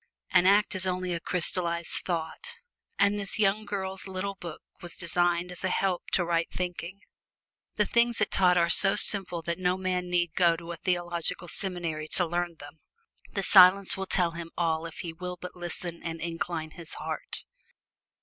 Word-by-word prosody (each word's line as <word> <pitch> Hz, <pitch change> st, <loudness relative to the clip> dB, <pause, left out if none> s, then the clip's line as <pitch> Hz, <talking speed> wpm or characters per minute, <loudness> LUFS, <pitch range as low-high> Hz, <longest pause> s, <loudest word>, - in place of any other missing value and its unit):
An 180 Hz, -, +5 dB
act 205 Hz, +2 st, +4 dB
is 190 Hz, 0 st, -2 dB
only 185 Hz, -1 st, -2 dB
a 170 Hz, -, -2 dB
crystallized 170 Hz, 0 st, -1 dB
thought; 175 Hz, -, -4 dB, 0.4 s
and 200 Hz, +1 st, +3 dB
this 200 Hz, -1 st, -1 dB
young 210 Hz, 0 st, +1 dB
girl's 190 Hz, -2 st, -4 dB
little 190 Hz, +1 st, -4 dB
book 170 Hz, -4 st, -9 dB, 0.2 s
was 175 Hz, -, -7 dB
designed 175 Hz, +1 st, +1 dB
as 180 Hz, -, -4 dB
a 190 Hz, -, +1 dB
help 185 Hz, -1 st, -1 dB
to 175 Hz, -, +3 dB
right 170 Hz, -1 st, 0 dB
thinking. 180 Hz, +2 st, -5 dB, 0.7 s
The 210 Hz, -, +2 dB
things 235 Hz, +2 st, +3 dB
it 215 Hz, -, 0 dB
taught 180 Hz, -2 st, +3 dB
are 170 Hz, -1 st, +3 dB
so 195 Hz, +3 st, +7 dB
simple 180 Hz, -4 st, 0 dB
that 170 Hz, +2 st, -3 dB
no 180 Hz, 0 st, +1 dB
man 180 Hz, -1 st, -2 dB
need 175 Hz, -2 st, 0 dB
go 170 Hz, -2 st, +3 dB
to 170 Hz, 0 st, -8 dB
a 170 Hz, -, -6 dB
theological 175 Hz, -1 st, -2 dB
seminary 170 Hz, -5 st, -1 dB
to 180 Hz, -, +3 dB
learn 175 Hz, 0 st, -2 dB
them: 150 Hz, +1 st, -13 dB, 0.5 s
the 195 Hz, -, -2 dB
Silence 190 Hz, 0 st, +7 dB
will 195 Hz, -1 st, -4 dB
tell 175 Hz, -3 st, +2 dB
him 165 Hz, 0 st, -7 dB
all 165 Hz, -1 st, 0 dB
if -, -, -8 dB
he 170 Hz, -2 st, -6 dB
will 180 Hz, +1 st, -6 dB
but 180 Hz, -, -8 dB
listen 175 Hz, -1 st, -6 dB
and 165 Hz, -1 st, -5 dB
incline 165 Hz, -1 st, -4 dB
his 165 Hz, -1 st, -10 dB
heart. 155 Hz, 0 st, -5 dB
180 Hz, 180 wpm, -28 LUFS, 170-190 Hz, 0.7 s, so